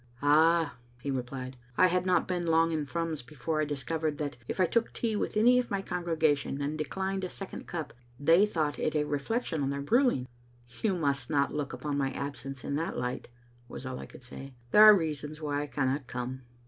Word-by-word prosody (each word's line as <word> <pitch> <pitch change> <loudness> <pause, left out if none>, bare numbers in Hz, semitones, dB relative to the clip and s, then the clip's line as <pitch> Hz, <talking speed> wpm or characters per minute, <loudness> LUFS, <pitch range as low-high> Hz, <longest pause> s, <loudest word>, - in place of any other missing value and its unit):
" 120 +1 -28
Ah," 160 +1 +4 0.2
he 140 +2 -3
replied. 130 0 -4 0.2
I 185 - +7
had 180 0 +1
not 180 -3 +3
been 175 -2 -1
long 165 0 +4
in 155 -3 -1
Thrums 165 -1 -2
before 150 +5 -3
I - - +1
discovered 150 +2 -2
that 145 -2 -3
if - - -4
I 185 - +5
took 230 +6 +1
tea 225 -2 -1
with 210 - -2
any 245 +3 +6
of 250 - -2
my 195 -1 -1
congregation 160 -6 0
and 145 +2 -2
declined 190 +5 -2
a 185 - -2
second 195 +1 -8
cup, 160 -4 -5 0.3
they 165 +8 +5
thought 155 -7 -1
it 155 - 0
a 150 - +3
reflection 150 - -1
on 135 - 0
their 140 0 -3
brewing." 235 - +2 0.5
"You 205 -4 +2
must 140 -5 -1
not 140 -2 +1
look 145 -2 -2
upon 145 -1 -3
my 135 -1 0
absence 135 -1 -5
in 140 - -2
that 165 +2 -2
light," 125 +1 -3 0.4
was 125 - -8
all 130 -1 -4
I - - -8
could - - -14
say. 135 +1 -10
" 120 - -30
There 210 - +7
are 215 -1 +10
reasons 150 -2 -3
why 145 -2 -1
I 145 - -4
cannot 135 -1 -1
come." 125 +1 -5
150 Hz, 215 wpm, -30 LUFS, 140-175 Hz, 0.5 s, are